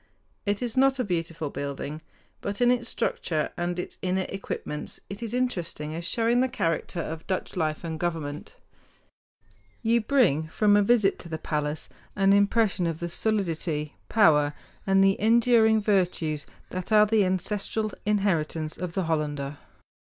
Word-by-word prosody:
It 205 +4 0
is 235 -2 -3
not 270 0 +4
a 250 - 0
beautiful 165 -6 -3
building; 140 +2 -5 0.4
but 200 0 -4
in 245 0 +5
its 240 -2 0
structure 155 -3 -1
and 175 0 -2
its 180 - -6
inner 185 0 0
equipments 170 -6 -5
it 200 - -6
is 230 -2 -4
interesting 175 -11 -2
as 170 +1 -5
showing 235 +1 +2
the 260 - +1
character 170 -6 -1
of 160 -1 -5
Dutch 185 -1 -2
life 155 -3 -1
and 160 -2 -4
government. 155 -4 -3 1.3
You 230 +1 +3
bring 215 - +2
from 205 +5 +3
a 205 - +5
visit 205 -2 +3
to 170 - -10
the 160 - -3
palace 150 -1 -3 0.3
an 195 -1 +4
impression 200 -2 +3
of 165 -2 -2
the 170 - -3
solidity, 165 -7 -1
power, 150 -9 +4 0.3
and 195 0 +5
the 195 0 +3
enduring 225 0 +5
virtues 180 -7 0 0.2
that 185 +3 -5
are 210 0 +7
the 215 -1 +3
ancestral 205 +3 -1
inheritance 170 -7 0
of 180 -2 -4
the 190 - 0
Hollander. 145 -3 -2
185 Hz, 155 wpm, -26 LUFS, 160-215 Hz, 1.3 s, are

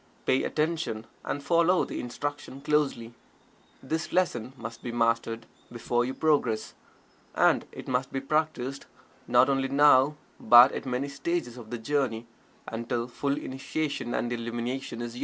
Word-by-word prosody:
Pay 130 - +3
attention, 155 -8 -1 0.2
and 140 - -3
follow 170 +4 +3
the - - -5
instruction 140 +2 -5
closely. 140 -6 0 0.7
This 160 +5 -3
lesson 130 -10 0
must 115 -1 -8
be 120 - -5
mastered 115 -1 0 0.3
before 120 0 0
you 130 - -4
progress. 135 -8 +1 0.6
And - - +3
it - - -10
must 130 +1 -1
be 135 - -2
practiced 140 -2 -2 0.4
not 125 +1 +5
only 135 -1 +1
now, 140 +1 +5 0.2
but 120 +4 +8
at - - -5
many 130 +2 -1
stages 140 -2 -3
of 120 -3 -11
the 120 - -4
journey, 120 -2 -1 0.4
until 115 +1 -3
full 140 +3 -2
Initiation 135 -2 -3
and 120 +1 -1
Illumination 120 +2 -4
is 120 -1 -6
yours. - - -7
130 Hz, 145 wpm, -28 LUFS, 120-145 Hz, 0.7 s, but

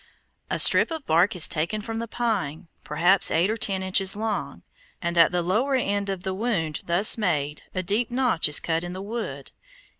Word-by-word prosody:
A - - -1
strip - - +6
of 320 -4 -6
bark 170 +5 +2
is 175 - +4
taken 170 +7 -2
from 225 +1 -5
the 230 - -5
pine, 195 -10 -3
perhaps 175 +6 +2
eight 175 +6 +1
or - - -1
ten 195 -4 -1
inches 190 +1 +1
long, 215 0 -4 0.4
and 170 0 -3
at 165 0 +5
the 175 -1 -1
lower 230 +10 0
end 200 -5 -1
of 190 -2 -4
the 190 -1 -3
wound 185 -8 -2
thus 190 +7 +3
made, 150 -7 -1
a 185 - -2
deep 205 +6 -1
notch 245 -11 +1
is 150 - +3
cut 165 0 -2
in 175 0 -6
the 185 - -7
wood. 225 +2 -6
190 Hz, 200 wpm, -24 LUFS, 170-220 Hz, 0.4 s, strip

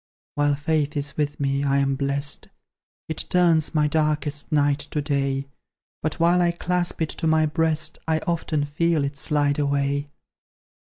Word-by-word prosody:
While 145 0 +2
Faith 150 0 -1
is 145 0 -2
with 145 -1 -2
me, 140 0 0
I 140 -1 +2
am 140 0 +2
blest; 140 +1 -2 0.6
It 160 - -3
turns 170 -3 +3
my 150 -1 +3
darkest 150 -1 -1
night 145 -1 +2
to 150 - -2
day; 140 -2 -1 0.6
But 155 +2 -2
while 175 +2 +4
I 175 - +3
clasp 175 -1 -1
it 155 - -2
to 165 - -3
my 160 0 +4
breast, 155 0 +1
I 160 -1 +2
often 160 -3 -1
feel 160 +1 +1
it 140 +1 -3
slide 145 0 +1
away. 140 0 0
150 Hz, 160 wpm, -24 LUFS, 140-160 Hz, 0.6 s, while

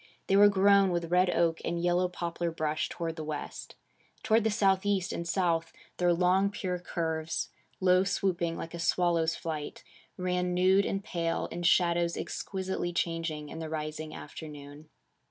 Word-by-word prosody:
They 195 - +2
were 205 +1 +8
grown 200 0 +5
with 170 -1 -2
red 180 +1 +4
oak 170 -2 +1
and 170 - -2
yellow 175 +1 +2
poplar 170 -1 -3
brush 155 -2 -2
toward 165 -1 -4
the 155 - -4
west. 150 -1 -6 0.5
Toward 220 0 +3
the 220 - +2
southeast 195 -2 +1
and 170 - -4
south 165 -2 0 0.3
their 175 -1 +3
long 180 +3 +3
pure 185 -3 -3
curves, 160 -2 -2 0.3
low 185 0 +4
swooping 180 -4 -1
like 165 - -6
a 170 - -6
swallow's 165 -1 +2
flight, 155 -3 -5 0.3
ran 180 -1 -1
nude 190 +2 +4
and 195 0 -2
pale, 165 -2 -2
in 175 - -5
shadows 170 -1 +3
exquisitely 190 -2 -3
changing 165 -3 -2
in - - -7
the 160 -1 -5
rising 155 0 -4
afternoon. 150 -1 -10
175 Hz, 155 wpm, -30 LUFS, 165-185 Hz, 0.5 s, were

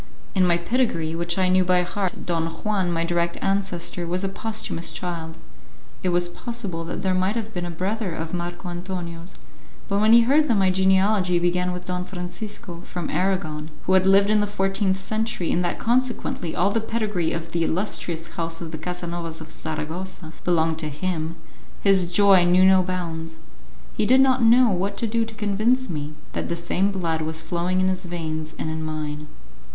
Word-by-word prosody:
In 185 -2 +3
my 170 -1 +4
pedigree, 170 -5 0
which 170 +1 -1
I 185 -1 +3
knew 185 0 +4
by 180 0 +3
heart, 185 +1 -3
Don 165 -2 0
Juan, 190 +1 -1
my 165 -1 0
direct 170 0 0
ancestor, 185 -3 -1
was 180 +2 -1
a 195 - 0
posthumous 215 -4 -3
child. 165 0 -5 0.6
It 185 - 0
was 175 0 +2
possible 195 -3 -5
that - - -5
there 190 -1 +2
might 185 +3 +1
have 225 -1 -4
been 175 -1 -3
a - - -5
brother 190 +4 -2
of 160 +1 -5
Marco 175 +1 -4
Antonio's; 175 -1 -5 0.5
but 200 -1 +1
when 215 +1 +4
he 235 +1 +9
heard 290 +6 +4
that 230 -5 +3
my 190 -1 +4
genealogy 190 0 +3
began 180 +1 +1
with 180 0 -6
Don 180 0 -2
Francisco, 180 0 -6
from 175 -3 -5
Aragon, 170 -5 -1
who 190 - +1
had 190 0 +5
lived 200 +2 +5
in 215 -1 +4
the 205 - 0
fourteenth 195 -1 0
century, 215 -1 -1
and 180 - +1
that 175 - -1
consequently 240 -8 0
all 195 +3 +2
the 225 - +1
pedigree 210 -7 -1
of 165 0 -4
the 170 0 0
illustrious 170 -2 -2
house 165 -1 -3
of 165 -2 -6
the 160 - -6
Casanovas 170 -1 -4
of 160 0 -10
Saragossa 160 +2 -5
belonged 160 -2 +2
to 155 -1 -2
him, 160 +1 -3 0.5
his 190 -3 +3
joy 195 -1 +6
knew 180 +2 +5
no 190 0 +6
bounds; 165 -3 -4 0.6
he 210 - 0
did 260 +2 +6
not 260 -1 +4
know 235 +1 +6
what 195 +2 -1
to 230 - 0
do 230 +1 +1
to 225 0 -10
convince 215 +4 +1
me 150 -1 -4 0.2
that - - -3
the 170 - 0
same 175 +3 0
blood 165 -4 -1
was 160 0 -2
flowing 180 +2 -1
in 185 - +2
his 185 0 -1
veins 160 -2 -4
and 155 - -3
in 160 0 -3
mine. 155 -1 -4
180 Hz, 190 wpm, -24 LUFS, 170-200 Hz, 0.6 s, he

